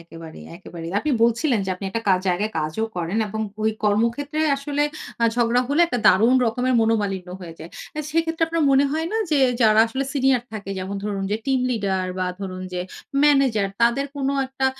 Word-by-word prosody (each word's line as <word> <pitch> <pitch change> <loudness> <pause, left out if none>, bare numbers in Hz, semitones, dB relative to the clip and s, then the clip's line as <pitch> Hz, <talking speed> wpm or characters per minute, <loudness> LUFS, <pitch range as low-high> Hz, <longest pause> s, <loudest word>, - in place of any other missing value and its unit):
একেবারেই, 165 -1 -11
একেবারেই। 165 -1 -8
আপনি 300 - -2
বলছিলেন 235 +1 +2
যে 190 - -3
আপনি 190 +2 -9
একটা 225 +3 -3
কা 190 - +6
জায়গায় 205 +5 0
কাজও 155 +8 -2
করেন 175 +4 -2
এবং 220 +2 -4 0.2
ঐ - - -2 0.2
কর্মক্ষেত্রে 235 +9 0 0.2
আসলে 290 +1 -2 0.4
আ - - +5
ঝগড়া 240 0 +2
হলে 290 +4 +2
একটা 250 -7 -2
দারুণ 225 +7 +5
রকমের 250 +3 0
মনোমালিন্য 205 -5 0
হয়ে 170 -2 -9
যায়। 165 - -10 0.3
আ - - -1
সেক্ষেত্রে 325 +1 +1
আপনার 330 -1 0
মনে 275 +1 +5
হয় 320 +1 -1
না - - 0
যে 300 - +3 0.2
যারা 215 0 +5
আসলে 265 +4 -3
সিনিয়র 265 -3 +2
থাকে 200 -2 -6
যেমন 190 +2 -4
ধরুন 200 -2 -2
যে - - +2
টিম 265 -1 +2
লিডার 195 -5 -1
বা 185 - 0
ধরুন 185 -1 -5
যে 180 - -2 0.4
ম্যানেজার 270 -9 +3
তাদের 235 +4 +3
কোন 275 -1 -1 0.2
একটা 265 0 -1
225 Hz, 190 wpm, -22 LUFS, 195-275 Hz, 0.4 s, কা